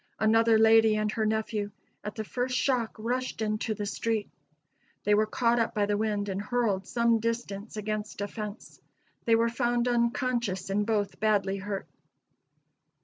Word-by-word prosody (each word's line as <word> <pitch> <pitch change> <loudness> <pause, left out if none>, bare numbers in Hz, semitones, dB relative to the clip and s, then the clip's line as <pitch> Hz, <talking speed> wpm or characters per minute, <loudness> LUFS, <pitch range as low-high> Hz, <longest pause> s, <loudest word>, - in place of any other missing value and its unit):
Another 225 +1 +4
lady 220 0 +6
and 215 0 0
her 220 -1 0
nephew, 215 -1 -1 0.3
at 210 0 -5
the 220 - -3
first 250 +3 -2
shock 245 -5 0
rushed 250 +3 -2
into 215 0 -1
the 205 - -4
street. 220 +1 -2 0.7
They 210 - +3
were 215 +1 +3
caught 235 +1 +2
up 230 - 0
by 205 -1 +2
the 205 0 0
wind 205 -1 -1
and 195 0 -2
hurled 210 -4 0
some 235 -1 +2
distance 225 -2 -3
against 215 0 -4
a 205 - -1
fence. 210 +1 -8 0.4
They 230 - +5
were 230 +1 +3
found 240 0 0
unconscious 235 -5 0
and 205 +2 0
both 205 -3 -1
badly 200 -2 +1
hurt. 195 0 -4
220 Hz, 160 wpm, -28 LUFS, 205-235 Hz, 0.7 s, lady